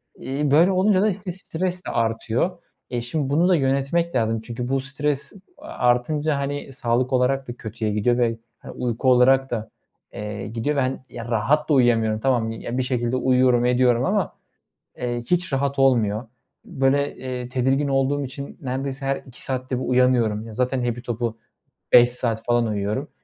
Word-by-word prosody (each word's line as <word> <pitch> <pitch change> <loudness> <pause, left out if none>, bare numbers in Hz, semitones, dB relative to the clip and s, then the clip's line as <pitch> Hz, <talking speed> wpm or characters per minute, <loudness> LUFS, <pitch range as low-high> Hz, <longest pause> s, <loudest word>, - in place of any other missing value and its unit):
İii, 140 +2 -2
böyle 165 +6 +5
olunca 190 +1 +3
da, 215 - +3
işte, 190 -1 -4
stres 180 0 -4
artıyor. 115 +9 -1 0.3
Eee, 120 -1 -2
şimdi 135 +3 -2
bunu 165 +6 +3
da 185 - +5
yönetmek 140 +4 0
lazım. 115 -2 +1
Çünkü 120 +2 -5
bu 135 0 +1
stres 140 +1 -3 0.2
artınca, 145 - 0
hani, 140 0 -4
sağlık 125 +1 0
olarak 130 +1 +1
da 120 - -5
kötüye 110 -1 -4
gidiyor 120 +3 +2
ve, 115 -2 +1 0.2
hani, - - -10
uyku 125 +1 -1
olarak 130 +2 +4
da, 110 -2 -3 0.4
eee, 105 0 -5
gidiyor 115 +7 -2
ve, 140 - +2
hani, 130 +1 -1 0.3
rahat 130 +8 +1
da - - +4
uyuyamıyorum. 115 -4 +3
Tamam, 120 -2 +1
ya, 120 +2 -5
bir 130 - +1
şekilde 125 -1 -1
uyuyorum 125 -1 +3
ediyorum 125 -1 +3
ama, 195 -2 0 0.7
eee, 120 -1 -2
hiç 180 -3 +1
rahat 140 +1 0
olmuyor. 115 -5 +2 0.4
Böyle, 140 - 0
eee, 125 -1 -5
tedirgin 135 +3 +1
olduğum 135 +1 +1
için 140 +2 -8
neredeyse 135 +1 -3
her 135 - +1
2 125 -2 -13
saatte 130 -1 -3
bir - - -3
uyanıyorum. 120 -4 +2
Ya, 110 - -9
zaten 125 +2 0
hepi 120 0 -2
topu 120 -2 -3 0.6
5 120 0 +8
saat 115 -2 -3
falan 120 -1 +2
uyuyorum. 105 +7 -2
130 Hz, 170 wpm, -23 LUFS, 120-140 Hz, 0.7 s, 5